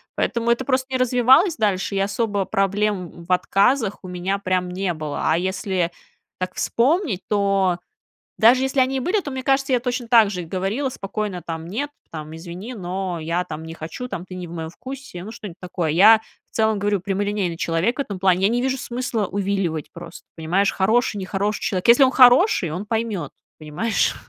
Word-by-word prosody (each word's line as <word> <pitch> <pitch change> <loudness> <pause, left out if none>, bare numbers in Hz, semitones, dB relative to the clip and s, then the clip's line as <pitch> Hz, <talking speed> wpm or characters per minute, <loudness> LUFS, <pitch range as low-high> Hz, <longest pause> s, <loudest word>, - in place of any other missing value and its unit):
поэтому 235 -1 -1
это 235 +2 0
просто 260 0 0
не 260 - +1
развивалось 255 - +4
дальше, 200 -3 0
и 195 - +1
особо 205 0 0
проблем 195 -3 -1
в 185 - -7
отказах 205 +5 +2
у - - -8
меня 180 +2 -2
прям 185 -2 -1
не 185 0 -1
было. 155 -2 -5
А 160 - +3
если 185 -1 -1 0.5
так 185 0 -4
вспомнить, 265 - +1
то 195 -3 +2 0.6
даже 245 +4 +6
если 265 0 +1
они 260 +1 +2
и - - -2
были, 360 +10 +1
то 295 - -6
мне 260 -1 -4
кажется, 270 0 +1
я 250 - +3
точно 245 -1 -3
так 225 -4 +6
же 180 -3 -4
и - - -7
говорила 195 - -2
спокойно 200 -4 -4
там: 165 -1 -6
"Нет, 235 +12 -3 0.2
там, 155 0 -7
извини, 180 +8 -8
но 185 -2 -4
я 165 +3 -1
там 160 -2 -7
не 160 - -7
хочу, 165 +11 -7
там, 180 -7 -5
ты 185 - -9
не 180 -1 -6
в 165 - -10
моем 160 -2 -5
вкусе", 260 -4 -9
ну, 220 - -8
что-нибудь 205 -6 -9
такое. 175 -3 -2
Я, 210 +7 +7 0.3
в - - -27
целом, 220 -1 +2
говорю, 205 -1 0
прямолинейный 195 -2 -1
человек 170 +9 0
в - - 0
этом 200 -8 -7
плане. 185 -1 +2
Я 195 - +5
не 245 - +1
вижу 265 0 0
смысла 240 -4 -2
увиливать 190 -5 -2
просто, 170 0 -11
понимаешь? 180 +5 +1
Хороший, 220 +4 +1
нехороший 200 +2 -2
человек. 185 +2 -1
Если 240 +4 +8
он 260 - +4
хороший, 250 - +5
он 180 +6 -4
поймет, 220 -9 -2 0.3
понимаешь? 155 +9 0
200 Hz, 195 wpm, -22 LUFS, 180-240 Hz, 0.6 s, Если